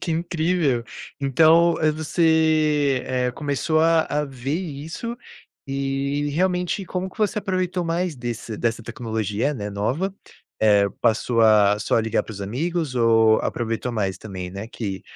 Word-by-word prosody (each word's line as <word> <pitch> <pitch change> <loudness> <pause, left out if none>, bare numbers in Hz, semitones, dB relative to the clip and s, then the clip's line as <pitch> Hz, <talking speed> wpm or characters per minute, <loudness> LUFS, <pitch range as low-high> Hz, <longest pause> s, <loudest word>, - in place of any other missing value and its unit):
Que 165 - -2
incrível. 160 -6 0 0.4
Então, 165 +5 +5
eh, 155 -1 +3
você, 155 -3 +2
eh, 125 -1 -1
começou 150 +3 0
a 165 0 +4
a 150 0 0
ver 135 +1 -4
isso, 165 +8 -6 0.5
e 140 +1 -1
realmente, 180 +3 0
como 185 +1 -4
que - - -20
você 210 0 +1
aproveitou 185 -3 -1
mais 170 0 -1
desse 120 -3 -5
dessa 115 0 -1
tecnologia 110 -1 -2
eh, 150 - -2
né, 105 -5 -4
nova? 130 - -2 0.5
Eh, 105 -2 +4
passou 115 +1 +1
a 105 -2 +5
só 110 - +1
ligar 115 0 0
para - - -9
os 100 - -9
amigos, 150 - -2
ou 115 -2 +4
aproveitou 115 +1 -2
mais 100 -5 -2
também, 95 -4 -7
né, 100 +3 -6
que, 100 -6 -5
140 Hz, 150 wpm, -23 LUFS, 115-165 Hz, 0.5 s, Então